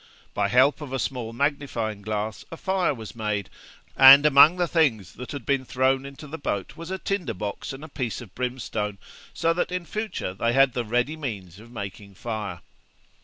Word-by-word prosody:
By 100 -1 +1
help 130 +8 +4
of 145 -3 -7
a 135 - -1
small 125 -3 -3
magnifying 120 -5 -2
glass 105 +1 -3
a 165 - -7
fire 190 -1 0
was 115 -6 -8
made, 105 -4 -3 0.4
and 135 +2 +10
among 150 +4 +7
the 175 -1 +1
things 125 - +1
that 125 - -8
had 140 -6 -6
been 140 -2 +1
thrown 130 +1 +1
into 140 +2 -11
the 155 +2 -7
boat 100 -8 -3
was 165 +1 -8
a 190 - -2
tinder 180 - -2
box 100 +2 -5
and 135 +2 -9
a - - -7
piece 125 -8 -4
of 120 -7 -12
brimstone, 120 -5 -3 0.3
so 165 0 +1
that 180 - -1
in 180 -1 -3
future 210 - -4
they 115 +5 0
had 135 -1 +4
the 120 - -1
ready 125 +7 0
means 100 - -6
of 115 +2 -14
making 100 -2 -8
a - - -24
fire. 105 -5 -5
125 Hz, 200 wpm, -25 LUFS, 105-145 Hz, 0.4 s, and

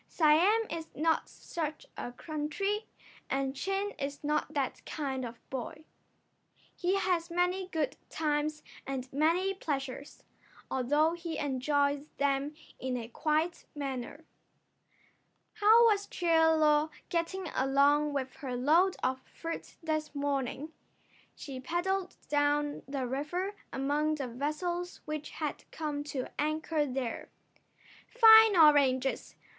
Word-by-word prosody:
Siam 350 +8 +4
is 325 -1 -4
not 320 +2 +1
such 310 -2 -5
a 245 - -5
country, 310 - -3 0.4
and 270 0 -1
Chin 390 +6 -1
is 280 +1 -4
not 300 +1 -1
that 275 -3 -2
kind 270 -4 -3
of 235 -1 -6
a - - -34
boy. 265 +4 -5 0.9
He 360 +2 +1
has 360 -4 0
many 360 +2 0
good 305 -6 -2
times 300 0 -1 0.2
and 265 -1 -4
many 335 +7 +2
pleasures, 280 -6 -5 0.5
although 295 +5 +2
he 335 -2 -5
enjoys 285 +1 0
them 280 +1 0 0.2
in 255 -1 -2
a 230 -1 -6
quiet 315 +6 0
manner. 280 +2 -5 1.3
How 440 +2 +6
was 410 -3 +3
Chie 345 -2 0
Lo 310 -1 +4 0.2
getting 345 +1 -2
along 285 +3 +3
with 265 -2 -3
her 260 -3 -4
load 325 +9 +4
of 260 0 0
fruit 330 0 -7
this 310 -1 -2
morning? 280 +1 -2 0.6
She 270 -3 -7
paddled 365 +6 -2
down 290 0 +1
the 275 -2 -2
river 300 +10 -2 0.2
among 295 +3 0
the 275 -4 -4
vessels 325 +8 -3
which 305 -1 -4
had 305 -2 -4
come 295 -2 -3
to 275 -3 -3
anchor 310 0 0
there. 255 -3 -4 0.8
"Fine 445 -4 +8
oranges! 275 -4 +4
300 Hz, 120 wpm, -31 LUFS, 275-335 Hz, 1.3 s, Fine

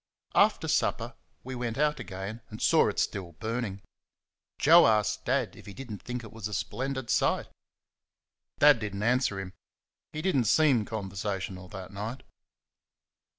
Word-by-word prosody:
After - - +3
supper - - 0 0.3
we 130 - -6
went 120 -2 -3
out 150 +1 +1
again 95 +4 -6
and 105 - -9
saw - - +4
it - - -5
still 90 -4 -2
burning. 110 0 -4 0.7
Joe 165 +4 +7
asked 105 -1 +1
Dad 125 -8 0
if - - -14
he 100 - -9
did 135 -4 -8
n't 105 - -6
think 125 -1 -5
it 110 - -11
was 110 -2 -5
a 105 - -4
splendid 130 -1 -3
sight? - - +1 1.1
Dad 145 -4 +7
did 105 -2 -4
n't 100 - -3
answer 120 -4 +2
him 95 -1 -6 0.6
he 155 +1 -5
did 190 -4 +1
n't 125 -5 +2
seem 135 -5 +4
conversational 95 -3 -4
that 95 +1 -9
night. 110 +6 -5
110 Hz, 160 wpm, -29 LUFS, 100-130 Hz, 1.1 s, Joe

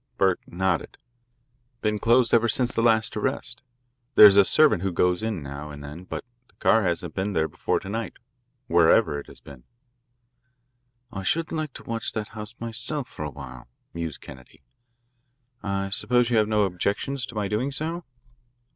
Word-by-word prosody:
Burke 95 -2 +2
nodded. 95 -1 -1 0.8
"Been 105 -1 0
closed 120 +1 +3
ever 115 0 +5
since 125 +2 +1
the - - 0
last 115 0 +2
arrest. 120 +2 -3 0.5
There's 105 -2 +10
a 100 - +8
servant 145 - +4
who 95 0 -1
goes 90 +1 +1
in 110 -8 -3
now 70 +2 -7
and 75 -1 -9
then, 75 +5 -9
but - - -6 0.2
the - - -30
car 115 - +3
hasn't 85 -3 -1
been 100 +2 -2
there 80 -2 +1
before - - -1
to - - -10
night, 110 +3 -4 0.5
wherever 85 - +4
it - - -11
has - - -14
been." 65 -3 -13 1.5
"I 95 -4 -5
should 160 - -1
like 155 -4 -3
to - - -10
watch 115 0 -3
that 105 -1 -4
house 110 +1 -8
myself 120 +5 -4
for - - -7
a 75 - -3
while," 65 -4 -10 0.3
mused 85 -3 -5
Kennedy. 65 -2 -14 1.0
"I 100 0 -2
suppose 125 +4 +2
you 115 - +3
have 105 -1 +3
no 105 -1 +2
objections 100 +8 -2
to 120 - -11
my 105 -2 -1
doing 110 +7 -1
so?" 165 +5 -3
105 Hz, 175 wpm, -25 LUFS, 85-115 Hz, 1.5 s, There's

